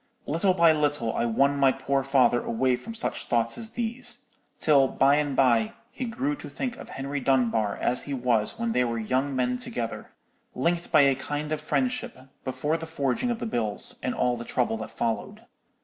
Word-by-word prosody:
Little 180 Hz, +5 st, +1 dB
by 170 Hz, -2 st, +6 dB
little 145 Hz, -6 st, 0 dB
I 115 Hz, -, +1 dB
won 140 Hz, +5 st, +2 dB
my 135 Hz, -1 st, +5 dB
poor 135 Hz, +1 st, 0 dB
father 130 Hz, -2 st, +3 dB
away 125 Hz, +2 st, +1 dB
from 225 Hz, -, -8 dB
such 225 Hz, -, -3 dB
thoughts 115 Hz, -1 st, +1 dB
as 225 Hz, -, -4 dB
these: 240 Hz, +1 st, -3 dB, 0.3 s
till 140 Hz, -3 st, +4 dB
by 140 Hz, +2 st, +3 dB
and 145 Hz, -2 st, 0 dB
by 120 Hz, -5 st, +3 dB, 0.2 s
he 255 Hz, -, -4 dB
grew 265 Hz, +5 st, -2 dB
to -, -, -9 dB
think 250 Hz, -2 st, -3 dB
of -, -, -10 dB
Henry 140 Hz, +1 st, -4 dB
Dunbar 120 Hz, -6 st, +1 dB
as 125 Hz, -, 0 dB
he 145 Hz, -, -4 dB
was 120 Hz, -4 st, +1 dB
when 230 Hz, 0 st, -1 dB
they 125 Hz, -, +2 dB
were 115 Hz, -1 st, -1 dB
young 130 Hz, +5 st, -1 dB
men 125 Hz, -1 st, 0 dB
together, 120 Hz, -2 st, -4 dB, 0.5 s
linked 170 Hz, +6 st, 0 dB
by 155 Hz, -3 st, +7 dB
a 140 Hz, -1 st, +5 dB
kind 145 Hz, +3 st, -4 dB
of 155 Hz, -1 st, -1 dB
friendship, 250 Hz, +8 st, -1 dB, 0.3 s
before 150 Hz, +4 st, -1 dB
the 165 Hz, 0 st, -7 dB
forging 140 Hz, -, -1 dB
of 240 Hz, -, 0 dB
the -, -, -4 dB
bills, 110 Hz, -, -2 dB
and 125 Hz, -, -2 dB
all 125 Hz, -1 st, +1 dB
the 120 Hz, -, -6 dB
trouble 120 Hz, -2 st, 0 dB
that 110 Hz, 0 st, -6 dB
followed. 115 Hz, -1 st, -3 dB
135 Hz, 195 wpm, -26 LUFS, 125-165 Hz, 0.5 s, by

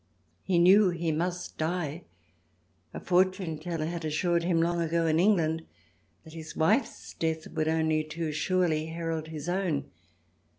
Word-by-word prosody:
He 185 Hz, -2 st, 0 dB
knew 190 Hz, +3 st, +6 dB
he 170 Hz, -2 st, -1 dB
must 175 Hz, +3 st, -3 dB
die; 165 Hz, 0 st, -2 dB, 0.9 s
a -, -, -6 dB
fortune 185 Hz, -3 st, +1 dB
teller 165 Hz, -1 st, -3 dB
had 170 Hz, +1 st, -4 dB
assured 170 Hz, +2 st, 0 dB
him 170 Hz, -1 st, +1 dB
long 170 Hz, +1 st, +1 dB
ago 165 Hz, 0 st, 0 dB
in 160 Hz, 0 st, +2 dB
England 165 Hz, -5 st, +2 dB, 0.6 s
that 160 Hz, -1 st, -13 dB
his 160 Hz, -1 st, -8 dB
wife's 210 Hz, -, 0 dB
death 160 Hz, -1 st, -2 dB
would 155 Hz, -, -2 dB
only 160 Hz, -1 st, +1 dB
too 155 Hz, 0 st, -4 dB
surely 160 Hz, -1 st, 0 dB
herald 165 Hz, -1 st, -4 dB
his 155 Hz, -1 st, -7 dB
own. 175 Hz, -5 st, -1 dB
165 Hz, 145 wpm, -28 LUFS, 160-175 Hz, 0.9 s, knew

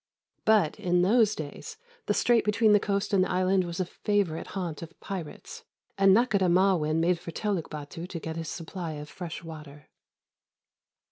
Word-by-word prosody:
But, 210 Hz, -8 st, +3 dB
in 180 Hz, 0 st, +2 dB
those 215 Hz, +1 st, +4 dB
days, 160 Hz, -, -7 dB, 0.3 s
the -, -, +1 dB
strait 240 Hz, -2 st, +3 dB
between 210 Hz, 0 st, +3 dB
the 205 Hz, -, +6 dB
coast 200 Hz, 0 st, -1 dB
and 190 Hz, -2 st, +5 dB
the -, -, -2 dB
island 185 Hz, 0 st, +2 dB
was 170 Hz, +1 st, -5 dB
a 185 Hz, -, +1 dB
favourite 195 Hz, -3 st, -1 dB
haunt 170 Hz, -5 st, -4 dB
of 165 Hz, 0 st, -10 dB
pirates, 180 Hz, -6 st, -7 dB, 0.3 s
and 195 Hz, 0 st, +5 dB
Nakhôdah 200 Hz, -7 st, +2 dB
Ma'win 175 Hz, -4 st, +3 dB
made 170 Hz, +1 st, +2 dB
for 175 Hz, -, -9 dB
Teluk 190 Hz, 0 st, -2 dB
Bâtu 155 Hz, +3 st, -7 dB
to 170 Hz, -, -5 dB
get 160 Hz, 0 st, -5 dB
his 165 Hz, -1 st, -4 dB
supply 170 Hz, -1 st, -5 dB
of 150 Hz, 0 st, -8 dB
fresh 170 Hz, -2 st, -7 dB
water. 150 Hz, -3 st, -11 dB
180 Hz, 175 wpm, -28 LUFS, 165-200 Hz, 0.3 s, the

